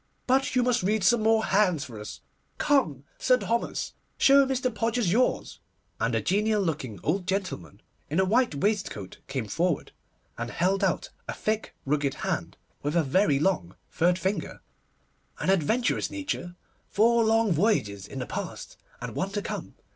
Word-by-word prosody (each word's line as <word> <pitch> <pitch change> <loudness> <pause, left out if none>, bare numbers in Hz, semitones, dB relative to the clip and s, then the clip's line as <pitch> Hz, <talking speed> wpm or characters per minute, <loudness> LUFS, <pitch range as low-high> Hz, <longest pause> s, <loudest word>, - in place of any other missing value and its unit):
'But 265 +1 +2
you 250 - +4
must 245 -1 +2
read 210 +2 +1
some 230 +5 +4
more 220 0 +3
hands 190 -7 +2
for 115 -6 -9
us. 105 - -8 0.4
Come, 245 - +2 0.2
Sir 255 -1 +4
Thomas, 235 -1 -2 0.2
show 275 0 +6
Mr. 255 -2 0
Podgers 225 -2 0
yours'; 250 +6 +1 0.4
and - - +1
a - - +1
genial 210 +1 +2
looking 135 - -3
old 180 +3 0
gentleman, 190 - -3 0.3
in 155 +5 0
a 190 - +4
white 230 - +2
waistcoat, 190 - -2
came 130 -5 -3
forward, 170 - -1 0.5
and - - -3
held 190 +3 +1
out - - 0 0.2
a - - -3
thick 215 0 -2
rugged 140 -1 0
hand, - - -3 0.2
with 145 +3 -2
a 170 - +4
very 145 +1 +3
long 145 - 0 0.2
third 175 +2 +2
finger. 190 +2 -3 0.8
'An - - +2
adventurous 195 +7 +1
nature; 285 - -4 0.3
four 230 +3 +3
long 225 -1 +3
voyages 150 - +1
in 135 - -9
the 125 - -3
past, - - -6 0.2
and - - -5
one 190 - -1
to 205 +1 -3
come. - - -5
195 Hz, 160 wpm, -27 LUFS, 150-225 Hz, 0.8 s, show